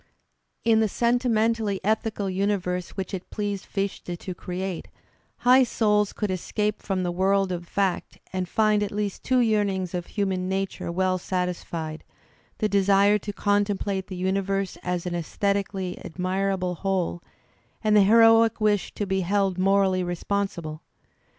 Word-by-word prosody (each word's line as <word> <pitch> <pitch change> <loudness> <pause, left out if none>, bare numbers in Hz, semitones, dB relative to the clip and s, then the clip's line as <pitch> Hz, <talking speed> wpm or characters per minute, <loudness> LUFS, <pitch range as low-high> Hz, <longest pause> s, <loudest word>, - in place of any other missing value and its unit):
In 225 -1 +4
the 220 - +3
sentimentally 230 -3 +1
ethical 215 -1 0
universe 185 -2 -1
which 190 0 -4
it 190 -1 -5
pleased 205 -2 -3
Fichte 195 -3 -3
to 185 - -6
create, 180 0 -5 0.5
high 250 +2 +6
souls 210 -4 +2
could 210 -2 -2
escape 210 +3 -2
from 190 -2 -1
the 175 - -1
world 190 +1 +2
of 175 -1 -4
fact 195 -2 -1 0.2
and 185 -1 -2
find 215 -1 +3
at 205 - 0
least 205 -1 -3
two 255 -1 +3
yearnings 200 -5 +1
of 175 -1 -3
human 190 -3 -1
nature 190 -2 -2
well 185 +1 +1
satisfied, 175 -3 -3 0.5
the 215 - +1
desire 200 +1 +4
to 205 - -5
contemplate 205 -1 0
the 185 - -6
universe 195 +1 -1
as 180 -1 -2
an 180 - -3
sesthet 200 +4 0
ically 190 -3 -5
admirable 185 +1 -1
whole 180 -1 -1 0.6
and 215 -1 +3
the 210 - +7
heroic 225 +2 +6
wish 210 -2 +1
to 205 - -2
be 190 0 0
held 195 0 0
morally 190 -1 +3
responsible. 175 -3 -3
195 Hz, 145 wpm, -25 LUFS, 185-210 Hz, 0.6 s, the